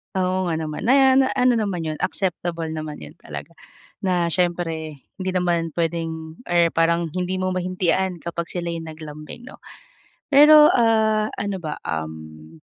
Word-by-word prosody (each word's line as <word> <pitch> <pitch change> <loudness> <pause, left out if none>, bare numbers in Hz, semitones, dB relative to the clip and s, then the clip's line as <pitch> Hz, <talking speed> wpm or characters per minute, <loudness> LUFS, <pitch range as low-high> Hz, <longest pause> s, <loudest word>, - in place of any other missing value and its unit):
Oo 185 0 0
nga 165 - 0
naman, 160 +6 -4
na 265 0 +6
na 265 - +4
ano 250 -2 +3
naman 190 -6 -2
'yon 155 -1 -4
acceptable 175 -3 -2
naman 155 -1 -6
'yon - - -13
talaga - - -8 0.5
na 180 -4 0
siyempre, 165 -3 -1 0.2
hindi 185 0 -2
naman 170 -3 0
puwedeng 165 -1 -3
or 170 -1 +3
parang 165 0 +1
hindi 185 +1 -2
mo 185 0 -1
mahindian 185 -1 -1
kapag 170 0 -4
sila'y 170 -1 -4
naglambing 155 +5 -9
'no. 255 - -12 0.7
Pero, 300 +1 +9
ah, 220 -2 +3
ano 200 -1 -2
ba, 155 -2 -4
um, 80 0 -6
170 Hz, 145 wpm, -22 LUFS, 160-190 Hz, 0.7 s, Pero